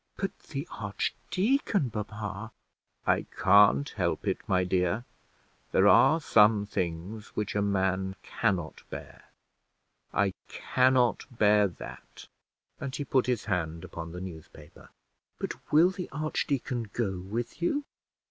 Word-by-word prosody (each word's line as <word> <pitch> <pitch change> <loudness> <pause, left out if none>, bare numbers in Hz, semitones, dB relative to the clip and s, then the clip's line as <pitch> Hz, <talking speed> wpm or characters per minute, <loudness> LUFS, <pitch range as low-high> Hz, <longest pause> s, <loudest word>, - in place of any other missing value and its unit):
"But 195 - -3
the 140 +2 -6
archdeacon, 185 - -1
papa?" 105 +1 -5 0.5
"I - - +2
can't 95 -7 +6
help - - -2
it, - - +1
my 90 -1 +2
dear; 90 +5 0 0.7
there 95 - +5
are 160 +9 +6
some 105 -7 +4
things 95 +3 -4
which 105 - -2
a 105 - +2
man 95 -1 0
cannot 95 -8 -1
bear: - - -9 0.9
I 100 -2 +1
cannot 130 -1 +2
bear 105 -4 +4
that;" 90 - -11 0.5
and 135 0 -4
he 145 - -3
put 130 -1 +2
his 125 -4 0
hand 85 -5 -2
upon 85 0 -7
the 90 +1 -7
newspaper. 80 -4 -11 0.5
"But - - -6
will 165 +5 +6
the 180 -1 -6
archdeacon 140 -5 -2
go 95 -6 -2
with 110 - -5
you?" 285 +12 +1
105 Hz, 125 wpm, -29 LUFS, 95-130 Hz, 0.9 s, can't